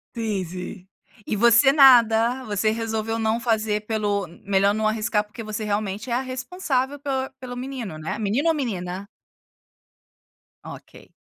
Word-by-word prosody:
Sim, 215 -4 -2
sim. 180 +2 -8 0.4
E - - -2
você, 235 +5 +6
nada. 245 -3 +5
Você 210 +1 0
resolveu 225 0 -2
não 220 +1 0
fazer 220 -3 0
pelo, 205 -3 -1 0.2
melhor 200 0 +2
não 215 0 0
arriscar, 215 -1 0
porque 210 +2 -10
você 215 0 -4
realmente 210 +2 -3
é - - -1
a 245 - +1
responsável 265 +1 -2
pel 265 -2 -2
pelo 250 -2 -7
menino, 250 - -6
né? 155 +1 -4
Menino 225 +9 0
ou 325 - +4
menina? 195 -8 -4 1.6
Ok. - - -12
220 Hz, 145 wpm, -23 LUFS, 205-255 Hz, 1.6 s, você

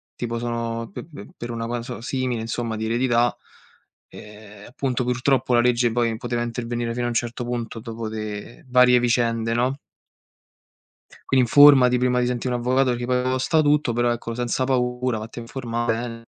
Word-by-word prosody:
tipo, 115 -1 -3
sono 115 -1 -3
pe - - -8
pe 140 -11 -11
per 120 0 -6
una 115 0 -4
cosa 120 0 -5
simile, 125 -1 -2
insomma, 115 0 -3
di 110 0 -3
eredità, 120 +1 +1 0.7
ehm, 105 -1 -13
appunto, 125 -1 -2
purtroppo 125 +1 +1
la 120 - +5
legge 120 -1 +2
poi 115 -1 0
poteva 120 0 -3
intervenire 120 0 -3
fino 120 0 -2
a 120 - 0
un - - -3
certo 120 +1 -2
punto 120 -2 -4
dopo 115 0 -6
le 110 +5 -7
varie 125 -1 +5
vicende, 115 -1 +1
no? 130 +4 0 1.5
Quindi 130 -2 +4
informati 130 -1 +7
prima 125 0 +1
di - - +1
sentire 125 0 -2
un 120 - -2
avvocato 130 +1 +2
perché 120 0 -3
poi 125 0 +1
costa 130 +5 +1
tutto, 150 -3 +2
però 120 +1 +1
ecco 115 0 -5
senza 120 +2 -1
paura, 125 -2 0
vatti 110 +3 -7
a - - -6
informare 120 -1 -2
bene. 115 0 -6
120 Hz, 175 wpm, -23 LUFS, 115-125 Hz, 1.5 s, informati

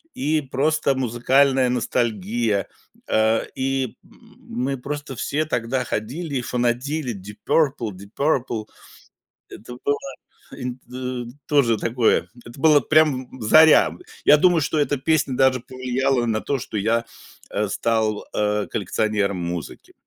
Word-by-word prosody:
и 155 +3 0
просто 140 +1 0
музыкальная 130 +2 +2
ностальгия, 115 -3 0 0.4
э, 110 +1 +2
и 135 -2 -2
м - - -21
мы 135 +3 -3
просто 145 +1 -6
все 145 +5 -1
тогда 125 -3 -1
ходили 135 +7 -4
и 130 - 0
фанатели: 125 +3 -1
"Deep 100 +2 -10
Purple, 135 -8 +1
Deep 100 +1 -13
Purple". 125 -7 0 0.8
Это 120 +3 -10
было 145 0 +1 0.5
инт 125 -1 -6 0.6
тоже 130 -7 +3
такое, 115 +2 +1 0.2
это 120 +3 -11
было 150 -1 +6
прям 140 -5 +2
в - - -9
заря. 155 +8 +6 0.4
Я 150 - +8
думаю, 175 +1 +4
что 155 - -1
эта 145 -1 +1
песня 145 -1 +1
даже 130 -1 +3
повлияла 130 0 -1
на 110 -1 0
то, 140 - -1
что 115 - -6
я, 115 +3 +1 0.5
э, 105 0 -1
стал, 110 0 0
э, 105 0 0
коллекционером 100 -1 -1
музыки. 85 -3 -6
125 Hz, 130 wpm, -22 LUFS, 110-140 Hz, 0.8 s, Я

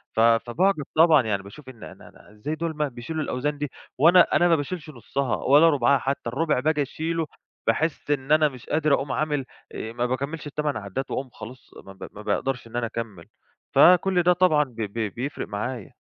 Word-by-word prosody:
ف - - -1
فباعجَب 120 - +2
طبعًا. 160 -3 +6
يعني 100 -3 -1
باشوف 130 +8 -12
إن 120 -4 -13
أنا - - -12
أنا - - -19
إزاي 105 +9 -5
دول 165 0 -3
ما 150 -1 0
بيشيلوا 140 +6 -5
الأوزان 145 +2 -2
دي 145 -1 -4 0.3
وأنا 170 +6 +7
أنا 175 - +4
ما 170 - +4
باشيلش 155 +1 -5
نُصّها 130 -3 -3
ولا 145 +8 +5
رُبعها 140 -2 +3
حتّى، 135 -3 -3
الربُع 150 +2 0
باجي 150 +1 +1
أشيله 160 +3 -2 0.4
باحِس 150 +5 0
إن 140 0 -1
أنا 155 -1 +5
مش 130 -2 -13
قادر 155 -1 +2
أقوم 135 0 0
عامل 150 -3 -1 0.3
آآ 110 +1 -6
ما 120 0 -1
باكمّلش 140 +5 -3
ال8 150 -1 -2
عدّات 110 +6 -5
وأقوم 130 -1 -3
خلاص، 120 +1 -12
ما 95 - -12
ب - - -9
ما 105 - -11
باقدرش 125 +4 -2
إن 115 - -12
أنا 120 -1 0
أكمّل، 110 -7 -7 0.5
فكل 180 0 +5
ده 180 +1 +5
طبعًا 175 -4 +3
ب 130 -5 -14
ب 105 0 -3
بيفرق 130 +5 -4
معايا. 110 +1 -5
140 Hz, 200 wpm, -24 LUFS, 120-155 Hz, 0.5 s, وأنا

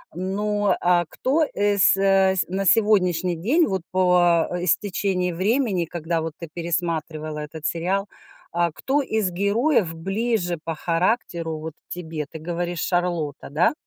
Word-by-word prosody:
Ну, 205 +2 0
а 175 0 +3
кто 300 +5 +1
эс 205 -1 +3
ась 195 -1 +3
на 195 +2 -2
сегодняшний 185 -4 +3
день 260 - +2
вот 190 -2 -1
по, 180 -2 +4
а, 175 0 -3
истечении 185 0 0
времени, 200 -1 +1
когда 165 0 -2
вот 160 -1 -4
ты 170 - -6
пересматривала 160 -2 -3
этот 150 +1 -7
сериал, 190 +5 -1 0.4
а, 170 -1 +1
кто 275 - 0
из 220 -6 0
героев 200 - +1
ближе 195 0 -1
по 165 0 -3
характеру 165 -1 -1
вот 160 0 -6 0.2
тебе? 160 -3 -5
Ты 160 - -7
говоришь 175 +1 -3
Шарлотта, 175 -6 -1
да? 170 - +3
180 Hz, 140 wpm, -23 LUFS, 165-200 Hz, 0.4 s, по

